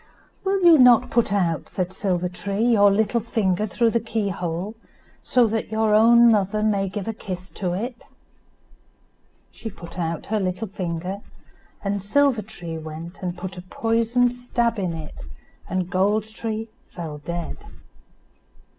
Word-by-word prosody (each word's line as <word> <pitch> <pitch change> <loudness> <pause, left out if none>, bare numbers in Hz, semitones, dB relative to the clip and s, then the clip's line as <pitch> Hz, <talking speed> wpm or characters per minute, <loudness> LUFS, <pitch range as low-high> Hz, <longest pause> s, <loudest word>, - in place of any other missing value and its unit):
"Will 390 -1 0
you 330 -3 +8
not 250 -1 +6
put 235 -4 +2
out," 175 -6 0
said 185 0 -3
Silver 180 -2 0
tree, 200 +4 -3
"your 210 -4 +6
little 220 +3 +2
finger 215 -3 0
through 230 +3 +2
the 235 - +2
key 225 -2 -2
hole, 175 +3 -3 0.5
so 250 -1 +3
that 225 0 -2
your 220 -1 +2
own 235 +2 +7
mother 210 0 +1
may 200 -2 +1
give 195 +1 -5
a 225 - -1
kiss 185 -3 -7
to 180 -3 -2
it?" 235 +6 -5 1.5
She 225 - -7
put 175 -2 -10
out 165 -2 -2
her 215 - +2
little 185 +2 -2
finger, 185 0 -4 0.6
and 200 0 -1
Silver 255 +3 +2
tree 175 -6 -7
went 160 +3 -8
and 180 -1 -3
put 185 +1 -6
a - - -7
poisoned 230 +5 +1
stab 240 -2 -1
in 180 -3 -1
it, 160 -2 -7 0.6
and 185 -1 -1
Gold 200 +4 +2
tree 220 0 -5 0.2
fell 160 -4 -7
dead. 170 +2 -5
200 Hz, 155 wpm, -23 LUFS, 180-225 Hz, 1.5 s, you